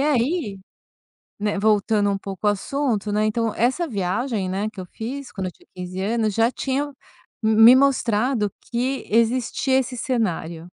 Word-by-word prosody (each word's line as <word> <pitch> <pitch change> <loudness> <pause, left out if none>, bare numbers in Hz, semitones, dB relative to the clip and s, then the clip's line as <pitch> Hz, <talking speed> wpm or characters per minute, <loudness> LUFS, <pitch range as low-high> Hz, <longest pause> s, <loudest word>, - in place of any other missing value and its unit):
aí, 275 - 0 0.8
né, 205 -1 -1
voltando 210 0 +2
um 200 - 0
pouco 195 +1 -4
o - - +6
assunto, 215 0 -1
né, 210 +1 +1
então 225 0 0
essa 260 +10 +1
viagem, 200 0 -2
né, 200 +3 -1
que 205 - -11
eu 185 - -5
fiz 255 +8 -7
quando 190 -2 -4
eu - - -5
tinha - - -25
15 180 0 -6
anos 215 +1 0
já 225 +3 +3
tinha 270 +2 -2 0.6
me 220 -1 +2
me 225 +3 +9
mostrado 250 -4 +2 0.2
que 255 +3 -1
existia 240 +4 +2
esse 255 -1 -4
cenário, 190 - -2
220 Hz, 160 wpm, -23 LUFS, 200-255 Hz, 0.8 s, me